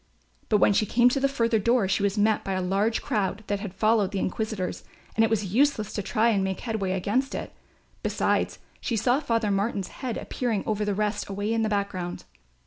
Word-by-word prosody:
But 215 - +4
when 205 - +4
she 210 +1 +2
came 240 +4 +5
to 275 - 0
the 275 0 +2
further 230 -4 +1
door 235 -1 +2
she 190 - +1
was 200 +1 0
met 215 +1 +2
by 195 - -2
a 185 - -1
large 200 +5 +1
crowd 210 -4 -1
that 205 -1 -1
had 195 -2 -6
followed 215 -1 +3
the 200 - -3
inquisitors 205 0 -2 0.3
and 225 - +4
it 225 - +3
was 205 -4 -1
useless 255 -4 +2
to 205 - -2
try 225 +3 +2
and 200 -4 +2
make 190 -1 -2
headway 215 -5 -2
against 210 +8 0
it; - - -5 0.5
besides - - 0 0.2
she 230 - -2
saw 245 +5 +2
Father 230 -7 0
Martin's 200 -1 -1
head 255 -4 -2
appearing 230 -6 -2
above 210 -1 -1
the 205 - 0
rest 210 0 -1
away 205 +3 -2
in 225 - +1
the 220 - +1
background. 200 -4 -3
210 Hz, 215 wpm, -26 LUFS, 195-230 Hz, 0.5 s, came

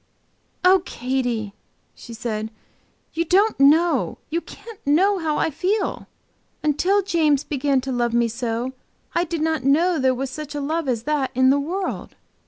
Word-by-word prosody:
'" - - -14
"Oh, 370 0 +6
Katy!" 245 - -2 0.4
she 235 - -12
said, 220 -2 -3 0.6
"you 335 - 0
don't 390 +4 +2
know, 315 +5 +4
you 335 +2 0
can't 455 +3 -12
know, 375 +8 +3
how 310 -3 -1
I - - +1
feel. 385 +7 -1 0.6
Until 360 +7 +2
James 310 -7 +2
began 275 -2 0
to 265 +1 -4
love 240 -1 0
me 235 0 +3
so 235 +2 -3 0.4
I 345 - +2
did 330 -1 -3
not 315 -3 0
know 320 +5 +3
there 260 -1 +2
was 265 +1 -4
such 305 0 -7
a - - -2
love 310 +2 -2
as 235 -3 -1
that 290 -2 0
in 260 +1 +5
the 285 - +3
world. 360 +7 -4
295 Hz, 170 wpm, -22 LUFS, 260-340 Hz, 0.6 s, Oh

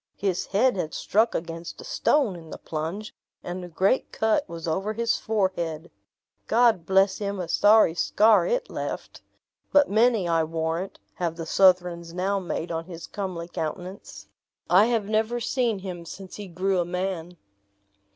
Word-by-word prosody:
His 190 -3 -1
head 215 +3 +2
had 160 -3 -3
struck 220 +3 +1
against 165 0 -5
a - - -8
stone 270 -11 +1
in 165 -2 -11
the - - -7
plunge, 165 +7 -5 0.3
and 180 +1 -5
a - - -6
great 190 +8 +1
cut 220 -1 +1
was 165 0 -6
over 195 +6 -1
his 230 +1 0
forehead. 175 -6 -2 0.6
God 225 -7 +3
bless 190 0 +3
him, 200 -1 -3
a 180 - -3
sorry 210 -3 +5
scar 215 +5 +4
it - - 0
left! - - -6 0.5
but 290 -5 +4
many, 220 -3 +3
I 165 -1 +2
warrant, 165 +3 -3 0.2
have 170 -2 -2
the 165 -1 -6
Southrons 175 -2 +3
now 195 +2 0
made 175 -2 -4
on 165 0 -3
his 170 -2 -8
comely 185 -4 -5
countenance. 180 +4 -6 0.4
I 190 +4 +7
have 230 -4 0
never 220 +3 0
seen 235 -2 0
him 180 -3 -7
since 190 +3 -9
he 205 -1 -7
grew 185 +2 0
a 175 - +1
man." 180 -1 -4
185 Hz, 160 wpm, -25 LUFS, 170-215 Hz, 0.6 s, I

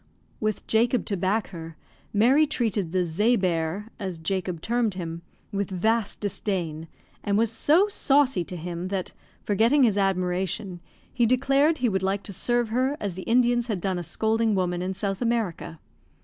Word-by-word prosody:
With 215 -2 -2
Jacob 235 +2 +2
to 205 - -1
back 195 +4 0
her, 165 -3 -9 0.3
Mary 260 +9 +4
treated 210 - -1
the 185 -1 +1
"zea 210 +9 +2
bear," 180 +1 -1
as 190 -4 -4
Jacob 180 +1 -2
termed 230 +1 0
him, 170 -2 -5 0.3
with 200 -2 -2
vast 215 +3 0
disdain, 175 -6 -3 0.4
and 200 -1 +1
was 225 0 +2
so 315 - +3
saucy 275 - +2
to 180 - -7
him 175 +1 -5
that, 190 -1 -3 0.3
forgetting 230 +8 +3
his 210 -4 +3
admiration, 185 0 -1 0.3
he 240 -2 +2
declared 275 +5 +3
he 250 - +1
would 190 -4 0
like 195 +1 -1
to 200 - -7
serve 240 +4 0
her 260 +5 0
as 200 -3 -3
the 185 - -7
Indians 240 0 +3
had 210 -6 -2
done 185 0 -1
a - - -4
scolding 220 +4 0
woman 180 -2 0
in 185 +1 -3
South 195 +1 -3
America. 215 -9 -2
200 Hz, 170 wpm, -25 LUFS, 180-235 Hz, 0.4 s, Mary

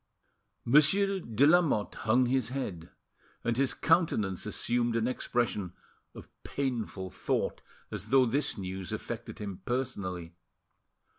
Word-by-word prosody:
Monsieur 190 +9 +4
de 115 - +2
Lamotte 155 - +3
hung 120 +3 +2
his 125 -1 +1
head, 95 -11 -4 0.5
and 115 - 0
his 135 +1 +1
countenance 110 - +1
assumed 120 +2 0
an 115 0 +1
expression 120 -7 -1 0.4
of - - -10
painful 115 -9 -3
thought, - - -1 0.3
as - - -5
though 130 -1 +5
this 135 +3 0
news 95 -1 -5
affected - - -5
him 100 -2 -6
personally. 95 -9 -3
120 Hz, 120 wpm, -30 LUFS, 100-135 Hz, 0.5 s, though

